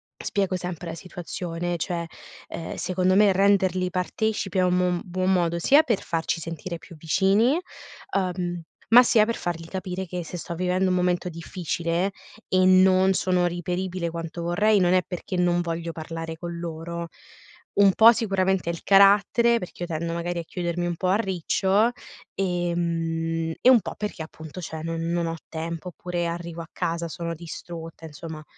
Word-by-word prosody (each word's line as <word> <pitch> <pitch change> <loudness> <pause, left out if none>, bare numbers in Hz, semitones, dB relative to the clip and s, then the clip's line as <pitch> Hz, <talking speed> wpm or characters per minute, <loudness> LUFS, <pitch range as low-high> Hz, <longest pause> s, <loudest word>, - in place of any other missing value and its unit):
spiego 195 -2 -1
sempre 180 -2 -5
la 165 - -5
situazione, 175 0 -5
cioè, 170 +1 -2 0.4
ehm, 165 - -6
secondo 185 0 +1
me 205 0 +6
renderli 190 -2 +3
partecipi 195 +1 -1
è - - +4
un 180 0 +2
mon 180 -1 +1
buon 185 +1 0
modo 170 -2 +1
sia 280 - +6
per 235 -10 0
farci 165 0 -2
sentire 165 +1 -5
più 170 - -14
vicini, 195 - +3 0.6
uhm, 180 -2 -2 0.3
ma 245 - +11
sia 225 -3 +4
per 230 +1 -1
fargli 165 -2 -4
capire 190 0 -4
che 180 0 -5
se 170 +2 -7
sto 170 +1 -6
vivendo 185 +2 +1
un 185 - +2
momento 180 0 +1
difficile 170 +1 -2 0.4
e 185 0 +3
non 185 0 +5
sono 180 -1 +2
reperibile 175 0 -3
quanto 170 0 -5
vorrei, 205 +5 +3
non 180 -1 +3
è 185 - +5
perché 180 +1 -5
non 175 -1 +2
voglio 170 0 -3
parlare 165 0 -6
con 170 0 -6
loro. 170 0 -5 0.7
Un 200 -1 +7
po' 225 +4 +8
sicuramente 190 -5 0
è - - 0
il 170 - -9
carattere, 205 +4 +5
perché 180 -3 -9
io - - -3
tendo 165 +1 -3
magari 170 +1 -3
a - - -4
chiudermi 175 +1 -3
un 175 -1 -1
po' 185 - -2
a 185 - +4
riccio 195 +1 +1 0.5
e 175 -2 0
mhmm, 165 -1 -1
e 255 - +6
un 240 -4 +6
po' - - -6
perché, 210 -5 -4
appunto, 160 +2 -9
cioè, 160 -2 -6
non 165 0 -3
non 170 +1 0
ho 165 0 -3
tempo; 165 +2 -5
oppure 175 0 -3
arrivo 170 0 -5
a 165 - -10
casa, 170 -1 -2
sono 170 +1 -4
distrutta, 165 0 -8
insomma 155 0 -8
175 Hz, 175 wpm, -25 LUFS, 170-185 Hz, 0.7 s, ma